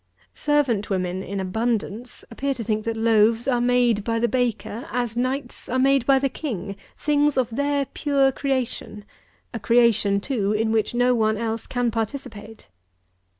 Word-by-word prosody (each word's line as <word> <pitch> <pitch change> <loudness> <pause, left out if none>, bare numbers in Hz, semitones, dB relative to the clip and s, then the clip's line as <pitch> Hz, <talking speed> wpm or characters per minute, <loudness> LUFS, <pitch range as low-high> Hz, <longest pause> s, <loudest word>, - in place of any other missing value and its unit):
Servant 280 -9 +1
women 185 -1 -1
in 200 +1 -5
abundance 220 +4 -3
appear 275 +4 -2
to 235 - -5
think 215 -1 -2
that 230 -1 -2
loaves 225 +1 +3
are 245 -3 +2
made 245 -3 +2
by 230 +1 -1
the 235 +1 +2
baker, 240 +1 -2
as 240 -2 -2
knights 255 +1 -3
are 255 - 0
made 270 -1 +3
by 275 -1 +6
the 275 +1 +1
king; 205 - -5 0.2
things 295 -1 +1
of 250 -3 +1
their 285 +1 0
pure 275 -1 +1
creation, 260 -6 -3 0.5
a 230 - -4
creation, 230 -3 +3
too, 210 -3 -1
in 220 +1 0
which 225 +1 0
no 245 +1 +3
one 220 -2 +1
else 225 0 -3
can 245 -2 0
participate. 220 -2 -6
235 Hz, 160 wpm, -23 LUFS, 215-260 Hz, 0.5 s, by